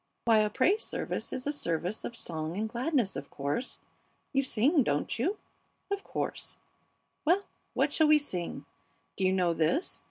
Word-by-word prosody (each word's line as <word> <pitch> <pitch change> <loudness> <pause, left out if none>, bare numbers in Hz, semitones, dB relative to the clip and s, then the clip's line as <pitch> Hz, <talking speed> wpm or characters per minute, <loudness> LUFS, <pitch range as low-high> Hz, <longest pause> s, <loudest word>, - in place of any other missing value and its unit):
"Why, 225 -2 +6
a 210 0 +3
praise 365 - +3
service - - -3
is 255 - -4
a 290 - +1
service 180 - -2
of 240 - -4
song 160 -4 -4
and 220 +1 0
gladness, 245 -1 0
of 140 - -5
course. 145 - -2 0.6
You 275 - +4
sing, 275 +4 +3
don't 145 - 0
you? 370 - +1 0.5
Of 400 0 -1
course. - - -4 0.7
Well, 360 +6 +4 0.3
what - - +2
shall 315 - +5
we 305 0 +8
sing? 180 - -3 0.5
Do 195 - -2
you 185 - +4
know 180 -2 +2
this?" 165 - +1
230 Hz, 165 wpm, -30 LUFS, 180-295 Hz, 0.7 s, we